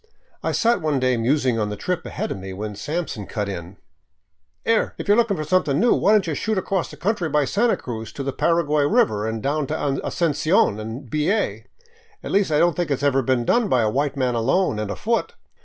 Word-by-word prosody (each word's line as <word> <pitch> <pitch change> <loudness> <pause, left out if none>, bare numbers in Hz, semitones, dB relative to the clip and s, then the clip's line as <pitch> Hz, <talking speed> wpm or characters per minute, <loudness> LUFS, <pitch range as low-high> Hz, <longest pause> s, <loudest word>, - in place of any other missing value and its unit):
I - - -1
sat 235 +1 +2
one 150 -3 0
day 130 0 +2
musing 125 0 +1
on 105 -1 -1
the 105 - -4
trip 180 - -3
ahead - - -4
of - - -4
me, 95 0 -7
when 105 +2 -5
Sampson 140 - -4
cut 105 -2 -3
in: 95 -1 -7 0.4
" 80 -2 -49
'Ere! 225 -1 +1
If - - -6
you 205 - +5
're - - +3
looking 230 -5 +2
for 155 - -2
something 150 -3 +1
new, 240 - +4
why 205 - +3
don't 215 -3 +4
you 165 - -2
shoot 220 +7 -1
across 190 -1 -1
country 190 -4 -1
by 150 -1 +2
Santa 230 - +1
Cruz 110 -3 -6
to 140 - -5
the 135 0 -3
Paraguay 150 -3 +2
river 110 -6 +2
and 110 -1 -4
down 145 +1 0
to 155 - -2 0.3
Asuncion 155 - +1
and 115 +5 -7
B. 150 +6 0
A.? 220 - -1 0.6
Least 200 -4 +1
I 150 - +3
don't 170 0 +3
think 175 -2 -1
it 140 - +1
's - - -6
never 135 -2 +3
been 130 -2 0
done 235 - +2
by 125 -7 +3
a 105 - +1
white 140 +2 -1
man 130 -2 +1
alone 125 - +1
and 105 -1 -3
afoot." 230 - -1
145 Hz, 230 wpm, -22 LUFS, 110-175 Hz, 0.6 s, you